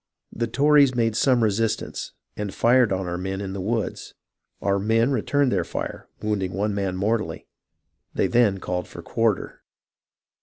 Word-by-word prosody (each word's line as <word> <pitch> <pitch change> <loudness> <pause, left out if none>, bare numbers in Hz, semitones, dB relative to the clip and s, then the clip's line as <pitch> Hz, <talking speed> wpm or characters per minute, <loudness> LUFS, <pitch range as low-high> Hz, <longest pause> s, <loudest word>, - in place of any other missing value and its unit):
The 115 +1 -1
Tories 140 +1 +4
made 115 -2 +1
some 125 0 +3
resistance, 110 +1 -1 0.2
and 105 -2 -4
fired 120 +2 +3
on 95 0 -1
our 90 0 -3
men 95 +1 -3
in 95 -1 -4
the 95 - -4
woods; 110 +3 -3 0.4
our 100 0 +1
men 100 - -5
then 115 +4 +3
returned 135 +2 +1
the 95 -3 +1
fire, - - -5 0.2
wounding 100 -4 -1
one 105 +3 -1
man 100 -2 -2
mortally; 105 -4 -1 0.6
they - - 0
then 115 -5 +3
called 90 -1 -3
for - - -10
quarter. - - -1
105 Hz, 160 wpm, -24 LUFS, 95-120 Hz, 0.6 s, Tories